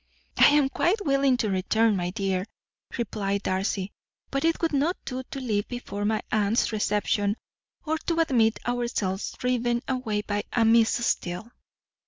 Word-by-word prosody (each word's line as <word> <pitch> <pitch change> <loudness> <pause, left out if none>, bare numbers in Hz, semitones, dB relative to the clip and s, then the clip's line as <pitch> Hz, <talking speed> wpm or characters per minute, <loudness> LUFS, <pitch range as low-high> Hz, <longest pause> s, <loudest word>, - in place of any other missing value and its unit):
"I - - +9
am 290 -1 +4
quite 400 +9 0
willing 275 -2 +3
to 215 -4 0
return, 215 +4 +2
my 175 -2 -1
dear," 190 -1 -1 0.5
replied 200 -4 -2
Darcy; 190 +1 -1 0.4
"but 275 0 -1
it 330 0 +2
would 330 -2 0
not 300 +6 +1
do 255 -1 -4
to 265 +1 -8
leave 215 -5 -1
before 205 -5 -5
my 215 0 0
aunt's 215 +2 +2
reception, 210 0 0 0.5
or 315 +1 -1
to 335 -1 +1
admit 235 -8 +3
ourselves 235 -6 -2
driven 245 -1 0
away 245 -6 -1
by 205 0 -2
a 230 -2 +3
Miss 230 +1 +4
Steele." 180 +5 -2
225 Hz, 155 wpm, -26 LUFS, 205-260 Hz, 0.5 s, I